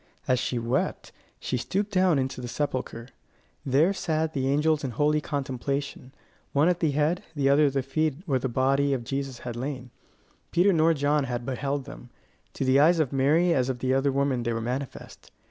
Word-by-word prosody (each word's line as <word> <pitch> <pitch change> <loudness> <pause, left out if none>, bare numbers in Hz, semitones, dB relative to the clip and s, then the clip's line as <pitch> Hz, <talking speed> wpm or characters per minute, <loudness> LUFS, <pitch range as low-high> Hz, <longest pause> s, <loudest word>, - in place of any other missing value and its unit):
As 125 -1 +2
she 125 - -2
wept, 120 +3 -2 0.3
she - - -2
stooped 200 - -2
down 185 -5 +3
into 130 -1 -2
the 120 - -5
sepulchre. 125 -2 -4 0.5
There 145 +7 +3
sat 160 -4 -1
the 135 -2 -1
angels 150 +2 +2
in 135 - -2
holy 150 +5 +1
contemplation, 140 -1 -4 0.4
one 145 +3 +3
at 175 -1 0
the 160 - +2
head, 150 +5 +1
the 140 -2 +2
other 145 +2 +5
at 135 - -2
the 135 -1 0
feet 155 +2 0
where 135 -6 +1
the 130 - -2
body 135 +3 +2
of 120 - -5
Jesus 135 +1 -4
had 120 -2 -4
lain. 130 0 -5 0.6
Peter 185 +3 +4
nor 165 0 +3
John 145 0 +1
had 120 -2 -4
beheld 135 +1 -2
them: 125 -3 -11 0.4
to 135 - -3
the 130 +1 +4
eyes 165 +4 +5
of 145 -4 0
Mary 155 +6 +3
as 130 -3 +1
of 130 - -2
the 130 +1 0
other 135 +1 +2
women 135 -2 0
they 120 0 -1
were 115 - -2
manifest. 125 +4 -6
140 Hz, 195 wpm, -26 LUFS, 130-150 Hz, 0.6 s, other